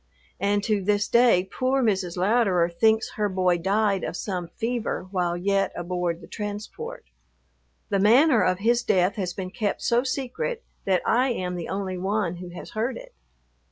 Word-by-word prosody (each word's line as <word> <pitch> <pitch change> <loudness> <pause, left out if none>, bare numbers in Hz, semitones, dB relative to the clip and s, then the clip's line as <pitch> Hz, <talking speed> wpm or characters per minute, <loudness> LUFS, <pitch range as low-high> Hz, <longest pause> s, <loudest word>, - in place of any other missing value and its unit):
And 200 +1 +1
to 210 -2 +1
this 205 +2 +1
day 235 -6 +5
poor 260 +1 +1
Mrs. 190 -5 0
Louderer 185 -3 +2
thinks 220 +5 +2
her 210 -1 +1
boy 185 -2 +1
died 200 +2 +1
of - - -3
some 180 -4 -3
fever 230 +1 -3
while 175 -2 0
yet 195 +1 +1
aboard 175 -1 -2
the - - -12
transport. 210 - -6 0.8
The 200 -2 +1
manner 240 +6 +5
of 185 0 +2
his 235 +4 +2
death 185 -3 +2
has 180 -3 -3
been 185 -1 -5
kept 205 0 -2
so 235 +1 +2
secret 290 - -3 0.2
that 185 -2 +2
I 255 +3 +3
am 185 -7 -2
the 175 -2 -5
only 190 -2 -3
one 190 -2 -1
who 180 0 -8
has 175 - -9
heard 230 +3 -2
it. - - -12
200 Hz, 170 wpm, -25 LUFS, 180-230 Hz, 0.8 s, day